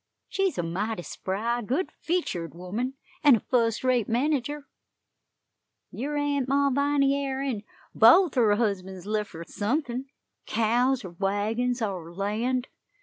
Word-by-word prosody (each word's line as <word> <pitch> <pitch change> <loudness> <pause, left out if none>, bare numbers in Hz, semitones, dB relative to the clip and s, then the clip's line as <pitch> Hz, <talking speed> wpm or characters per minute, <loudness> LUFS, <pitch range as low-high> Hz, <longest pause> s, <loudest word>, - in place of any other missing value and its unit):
She's 390 -2 0
a 175 - 0
mighty 185 +4 -2
spry, 225 +8 -2
good 265 - -1
featured 190 - -2
woman, 215 +10 -3 0.3
an' 285 -4 +8
a - - 0
fust 230 -1 +1
rate 250 -4 +2
manager, 285 +3 0 1.2
yer 290 +5 -3
Aunt 285 -3 0
Malviny 280 0 +3
air, 275 -1 -2
an' 250 -7 -2 0.3
both 285 - +7
her 220 -5 +4
husbands 190 -4 -2
lef' 210 0 -2
her 165 - -7
suthin 245 - -2 0.4
cows, 240 +2 +2
or 180 - -7
wagons, 215 +7 -1
or 180 -5 -4
land. 225 +7 -1
240 Hz, 130 wpm, -27 LUFS, 205-275 Hz, 1.2 s, an